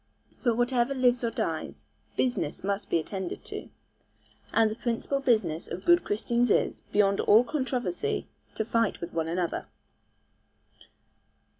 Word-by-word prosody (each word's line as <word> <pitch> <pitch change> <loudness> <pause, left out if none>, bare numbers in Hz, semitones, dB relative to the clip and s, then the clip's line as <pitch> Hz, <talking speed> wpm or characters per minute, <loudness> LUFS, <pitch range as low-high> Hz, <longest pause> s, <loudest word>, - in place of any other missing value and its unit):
But 235 -3 +2
whatever 245 +2 +1
lives 250 -1 +3
or 235 - +2
dies, - - -3 0.3
business 245 - -1
must 200 +1 -2
be - - +3
attended 185 +3 -4
to; - - -7 0.8
and 225 -1 +4
the - - -4
principal 240 +4 -1
business 215 - +1
of 175 +2 -6
good 345 +1 +6
Christians 235 +3 +1
is, - - +1
beyond 200 -1 +3
all 220 +3 +6
controversy, 300 - -2 0.3
to 220 - -1
fight 230 -1 +1
with 170 0 -6
one 165 -1 -1
another. 170 +1 -2
230 Hz, 135 wpm, -28 LUFS, 195-250 Hz, 0.8 s, good